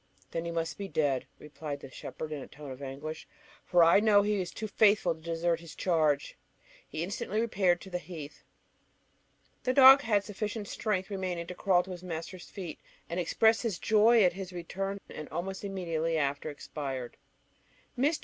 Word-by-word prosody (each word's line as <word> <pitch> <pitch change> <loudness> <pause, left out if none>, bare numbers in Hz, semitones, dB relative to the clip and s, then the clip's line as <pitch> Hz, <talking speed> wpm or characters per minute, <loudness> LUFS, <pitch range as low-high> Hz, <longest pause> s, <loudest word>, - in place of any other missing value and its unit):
"Then 165 0 -3
he 170 - -3
must 165 +2 -3
be 200 - -3
dead," 140 -8 0
replied 150 -1 -7
the 135 - -10
shepherd 155 +4 -7
in 150 -2 -4
a - - -8
tone 145 -1 -10
of 130 +1 -9
anguish, 145 +4 -6 0.4
"for 175 -1 +5
I 170 +4 +7
know 205 -1 +5
he 210 0 +1
was 180 -2 -2
too 215 - -5
faithful 205 -4 +4
to 160 - -16
desert 165 +1 0
his 165 -2 -11
charge." 155 -5 +1 0.5
He 155 - -4
instantly 200 +3 -2
repaired 190 -6 +2
to 190 - -11
the 180 - -1
heath. 155 -3 -9 1.2
The 255 0 0
dog 270 +1 +10
had 210 -6 +2
sufficient 210 +1 -4
strength 200 -2 -2
remaining 185 -3 -3
to 180 - -6
crawl 180 -1 +3
to 190 - -9
his 175 -1 -7
master's 175 +1 -6
feet, 180 -6 -7 0.3
and 170 - -1
express 220 +6 +3
his 225 -7 -1
joy 220 +2 +5
at 180 -2 +4
his 190 0 -6
return, 195 +3 -4
and 155 - -8
almost 190 +5 -4
immediately 165 -4 -1
after 140 0 -1
expired. 135 -4 -5 0.8
Mr. 290 +5 +2
175 Hz, 180 wpm, -30 LUFS, 160-200 Hz, 1.2 s, dog